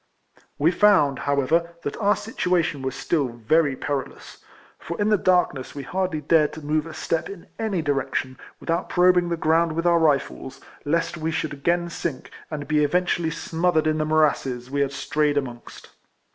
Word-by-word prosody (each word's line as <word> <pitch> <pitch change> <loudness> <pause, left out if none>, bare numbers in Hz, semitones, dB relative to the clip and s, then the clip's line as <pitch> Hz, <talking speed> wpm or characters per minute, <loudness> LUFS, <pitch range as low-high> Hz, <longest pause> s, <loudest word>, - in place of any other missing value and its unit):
We 155 +4 +3
found, 185 -8 +4
however, 165 +5 +1
that 145 - -3
our 205 -1 +3
situation 175 -8 -1
was 130 0 -3
still 150 -5 0
very 130 +5 +1
perilous; 140 -1 -5 0.4
for 170 - -6
in 205 +1 +2
the 210 - +4
darkness 180 -9 +1
we 140 - -5
hardly 180 0 -2
dared 150 0 +3
to 155 -2 -9
move 155 +1 0
a 165 - -8
step 165 0 -2
in 200 -4 -9
any 205 -7 -1
direction, 135 -2 -2 0.2
with - - -4
out 170 +2 -1
probing 180 -1 +4
the 170 - -1
ground 165 +1 +2
with 165 +2 -2
our 170 -1 +4
rifles, 140 -3 0 0.3
lest 165 +3 0
we 160 0 -2
should 155 -1 -2
again 170 +5 0
sink, 160 -4 -5 0.2
and 145 -3 -5
be 150 0 +2
eventually 175 +1 +1
smothered 165 0 0
in 155 0 +1
the 155 - 0
morasses 135 -5 +1
we 140 0 0
had 140 -1 0
strayed 145 +2 0
amongst. 120 -4 -6
155 Hz, 175 wpm, -24 LUFS, 140-170 Hz, 0.4 s, found